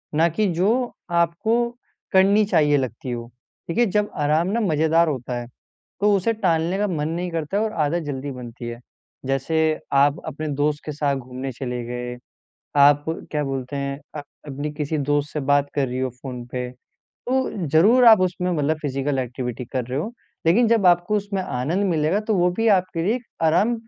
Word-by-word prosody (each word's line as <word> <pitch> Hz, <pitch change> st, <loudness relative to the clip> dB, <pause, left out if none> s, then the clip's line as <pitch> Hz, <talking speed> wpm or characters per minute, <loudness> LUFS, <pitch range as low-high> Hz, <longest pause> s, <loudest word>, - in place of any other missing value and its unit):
ना 165 Hz, +2 st, +4 dB
कि 210 Hz, +6 st, 0 dB
जो 225 Hz, +9 st, +1 dB, 0.2 s
आपको 175 Hz, +8 st, +1 dB, 0.4 s
करनी 195 Hz, +3 st, +5 dB
चाहिए 150 Hz, -7 st, +3 dB
लगती 130 Hz, -1 st, -4 dB
हो। 120 Hz, -1 st, -4 dB, 0.4 s
देखिए 235 Hz, +8 st, +3 dB
जब 210 Hz, 0 st, 0 dB
आराम 150 Hz, +3 st, +1 dB
ना 215 Hz, +5 st, 0 dB
मज़ेदार 165 Hz, -2 st, +3 dB
होता 125 Hz, -3 st, -3 dB
है 120 Hz, -, -7 dB, 0.5 s
तो 210 Hz, +1 st, +4 dB
उसे 200 Hz, +4 st, +1 dB
टालने 175 Hz, -4 st, +1 dB
का 210 Hz, +1 st, +1 dB
मन 155 Hz, -5 st, -2 dB
नहीं 175 Hz, +2 st, -2 dB
करता 165 Hz, +3 st, -2 dB
है 210 Hz, -, +2 dB
और 220 Hz, -, -1 dB
आदत 165 Hz, +3 st, 0 dB
जल्दी 140 Hz, -1 st, -4 dB
बनती 120 Hz, -2 st, -8 dB
है। 120 Hz, 0 st, -6 dB, 0.5 s
जैसे 135 Hz, +4 st, -1 dB, 0.4 s
आप 140 Hz, +1 st, +4 dB
अपने 155 Hz, +2 st, -5 dB
दोस्त 145 Hz, +1 st, 0 dB
के 150 Hz, -, -3 dB
साथ 145 Hz, -1 st, 0 dB
घूमने 130 Hz, +1 st, -6 dB
चले 125 Hz, -1 st, -4 dB
गए। 125 Hz, 0 st, -5 dB, 0.6 s
आप 145 Hz, +1 st, +6 dB, 0.3 s
क्या 150 Hz, -1 st, -1 dB
बोलते 135 Hz, 0 st, -4 dB
हैं, 140 Hz, 0 st, -3 dB, 0.2 s
अ, -, -, -5 dB, 0.3 s
अपने 145 Hz, +2 st, -4 dB
किसी 150 Hz, +1 st, -2 dB
दोस्त 145 Hz, +1 st, 0 dB
से 150 Hz, -, -2 dB
बात 145 Hz, 0 st, +3 dB
कर 140 Hz, -2 st, +1 dB
रही 125 Hz, +1 st, -4 dB
हो 130 Hz, 0 st, -1 dB
फ़ोन 125 Hz, -3 st, -6 dB
पे 125 Hz, -1 st, -3 dB, 0.6 s
तो 255 Hz, -8 st, 0 dB
ज़रूर 205 Hz, -, +5 dB
आप 220 Hz, -4 st, +9 dB
उसमें 180 Hz, 0 st, 0 dB
मतलब 155 Hz, -1 st, +1 dB
फ़िजिकल 135 Hz, -1 st, -1 dB
एक्टिविटी 125 Hz, -1 st, -4 dB
कर 130 Hz, -3 st, -1 dB
रहे 130 Hz, +2 st, -3 dB
हो। 210 Hz, +10 st, -3 dB, 0.3 s
लेकिन 225 Hz, +8 st, +4 dB
जब 225 Hz, -4 st, +3 dB
आपको 175 Hz, +4 st, +4 dB
उसमें 200 Hz, -1 st, -2 dB
आनंद 170 Hz, +5 st, -1 dB
मिलेगा 160 Hz, +4 st, +1 dB
तो 220 Hz, -, +3 dB
वो 180 Hz, 0 st, +3 dB
भी 225 Hz, 0 st, +3 dB
आपके 185 Hz, -4 st, +2 dB
लिए 210 Hz, +5 st, +2 dB
एक 250 Hz, -, -8 dB, 0.2 s
आराम 175 Hz, +9 st, +3 dB
155 Hz, 190 wpm, -23 LUFS, 135-190 Hz, 0.6 s, आप